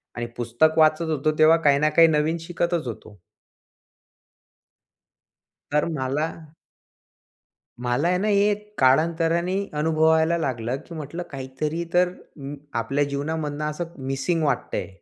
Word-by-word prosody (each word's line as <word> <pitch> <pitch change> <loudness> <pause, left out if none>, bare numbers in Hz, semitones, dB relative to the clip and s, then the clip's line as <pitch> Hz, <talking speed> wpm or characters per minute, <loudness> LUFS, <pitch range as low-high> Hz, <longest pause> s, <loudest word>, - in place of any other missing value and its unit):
आणि 120 - -3
पुस्तक 120 +7 +1
वाचत 155 +1 +4
होतो 155 0 +1
तेव्हा 160 +1 +7
काही 140 0 +5
ना 155 +1 +3
काही 165 +2 +6
नवीन 155 +1 +1
शिकतच 170 -3 -1
होतो. 105 -4 -9 2.5
तर 150 0 +2
मला 145 +1 -1 1.5
मला 125 +6 0
आहे 180 +1 +2
ना 210 +3 -1
हे 205 0 +3 0.2
काळांतराने 165 +6 +2 0.2
अनुभवायला 160 +1 +3
लागलं, 125 -5 -2
की 170 - -10
म्हटलं 160 +3 -6
काहीतरी 145 +5 -4
तर 180 0 +4 0.3
अं, 140 +1 -7 0.2
आपल्या 135 +5 0
जीवनामधनं 150 +1 -3
असं 170 +2 -6
मिसिंग 145 +5 -1
वाटतंय. 140 -4 -1
155 Hz, 120 wpm, -24 LUFS, 140-165 Hz, 2.5 s, तेव्हा